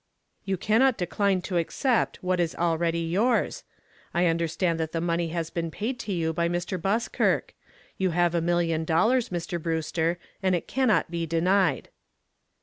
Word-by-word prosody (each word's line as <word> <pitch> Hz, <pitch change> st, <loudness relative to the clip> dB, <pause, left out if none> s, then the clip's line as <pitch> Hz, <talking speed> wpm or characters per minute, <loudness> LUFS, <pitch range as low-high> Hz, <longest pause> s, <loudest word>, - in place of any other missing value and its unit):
"You 195 Hz, -1 st, -1 dB
cannot 230 Hz, +7 st, +3 dB
decline 190 Hz, +1 st, 0 dB
to 180 Hz, -, -2 dB
accept 185 Hz, -, 0 dB
what 180 Hz, 0 st, 0 dB
is 170 Hz, -2 st, 0 dB
already 170 Hz, 0 st, 0 dB
yours. 205 Hz, +9 st, +1 dB, 0.5 s
I 175 Hz, +1 st, +3 dB
understand 165 Hz, 0 st, 0 dB
that 160 Hz, -1 st, -3 dB
the 165 Hz, -, 0 dB
money 170 Hz, 0 st, 0 dB
has 165 Hz, 0 st, -3 dB
been 165 Hz, -1 st, -2 dB
paid 230 Hz, +9 st, -4 dB
to 210 Hz, -, -5 dB
you 165 Hz, -3 st, 0 dB
by 170 Hz, +1 st, 0 dB
Mr. 175 Hz, +1 st, -2 dB
Buskirk. 215 Hz, +6 st, 0 dB, 0.5 s
You 190 Hz, -1 st, +2 dB
have 175 Hz, 0 st, +2 dB
a 170 Hz, -, +1 dB
million 165 Hz, -1 st, +1 dB
dollars, 220 Hz, +10 st, +2 dB
Mr. 175 Hz, -1 st, -3 dB
Brewster, 165 Hz, +1 st, -1 dB, 0.2 s
and 185 Hz, -2 st, +2 dB
it 170 Hz, -, -4 dB
cannot 255 Hz, -9 st, +1 dB
be 170 Hz, -1 st, -2 dB
denied." 180 Hz, +4 st, +1 dB
175 Hz, 160 wpm, -26 LUFS, 165-195 Hz, 0.5 s, cannot